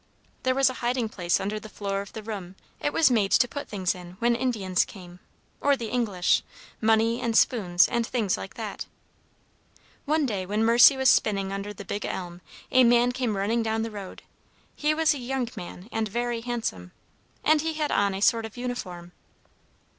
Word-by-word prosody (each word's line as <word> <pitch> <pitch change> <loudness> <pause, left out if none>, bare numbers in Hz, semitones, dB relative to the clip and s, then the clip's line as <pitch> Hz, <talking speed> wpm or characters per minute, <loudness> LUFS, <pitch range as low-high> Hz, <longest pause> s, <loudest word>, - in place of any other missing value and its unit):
"There 255 0 +1
was 270 -1 +4
a 255 - +1
hiding 240 -1 0
place 175 -4 0
under 210 +2 -3
the 215 - -11
floor 200 -1 -3
of 200 - -11
the 220 - -7
room. 195 -4 -6 0.2
It 290 - -1
was 315 -4 +4
made 210 -5 +2
to 245 - +5
put 285 +4 -6
things 190 -4 -1
in 180 -1 -11
when 235 +3 +2
Indians 215 -7 0
came, 180 -2 -12 0.4
or 285 0 +3
the 230 -3 -5
English, 205 -8 +1 0.4
money 225 +1 +2
and 230 -2 +1
spoons, 185 -7 +4
and 235 -1 0
things 220 -7 0
like - - -8
that. - - -6 1.2
"One 305 +1 +2
day 205 -7 -2
when 210 +4 0
Mercy 240 +4 +7
was 265 0 +4
spinning 195 -2 +1
under 200 +1 -4
the 200 -1 -10
big 205 - -4
elm, 175 -1 -5 0.3
a 255 0 +6
man 240 +1 +4
came 245 -5 -2
running 220 +4 +1
down 220 0 -1
the 225 - -4
road. 200 -3 -9 0.5
He 305 +1 +1
was 320 -1 +3
a 285 - -6
young 255 0 -2
man, 180 +2 -9
and 225 -1 -1
very 240 +2 -2
handsome, 225 - -4 0.5
and 310 0 +4
he 320 +1 -2
had 305 -1 -2
on 200 -1 +1
a 195 - -5
sort 225 0 +3
of 220 - -17
uniform. 185 -9 -5
225 Hz, 190 wpm, -26 LUFS, 195-245 Hz, 1.2 s, Mercy